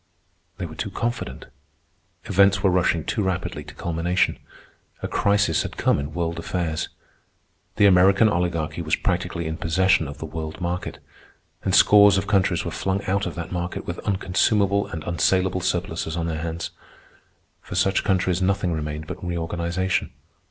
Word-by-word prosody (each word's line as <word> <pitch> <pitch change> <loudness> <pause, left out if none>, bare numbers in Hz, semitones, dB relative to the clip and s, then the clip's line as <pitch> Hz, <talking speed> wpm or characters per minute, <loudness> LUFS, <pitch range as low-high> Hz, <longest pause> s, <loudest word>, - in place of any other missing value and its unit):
They - - -4
were - - -8
too - - -4
confident. 120 - -4 0.8
Events 100 +1 +3
were 95 - +4
rushing 85 -3 +2
too - - -1
rapidly 95 -2 -2
to - - -12
culmination. 85 +2 0 0.6
A - - 0
crisis 100 -5 +2
had - - -6
come - - +2
in 70 +2 -5
world 85 -1 -2
affairs. 85 -2 -2 0.9
The 105 - +4
American 95 +3 +6
Oligarchy 85 -4 -1
was 80 -2 +1
practically 85 - -2
in 80 0 -3
possession 90 0 +2
of 70 - -8
the - - -6
world 80 0 -6
market, 90 0 -3 0.7
and - - +2
scores 100 -1 +7
of 95 - -1
countries 100 -3 +1
were - - -3
flung 95 +1 -2
out 95 0 0
of 90 - -6
that 85 -1 -6
market 90 0 -4
with 85 - -5
unconsumable 100 +1 +1
and 80 -1 -6
unsalable 95 +2 +1
surpluses 85 -2 -2
on 85 - -1
their 80 -1 -3
hands. 85 0 -4 0.9
For - - -8
such 95 0 +2
countries 95 -2 +1
nothing 95 -2 +1
remained 75 0 -4
but - - -8
reorganization. 85 +1 -1
90 Hz, 160 wpm, -23 LUFS, 85-95 Hz, 0.9 s, scores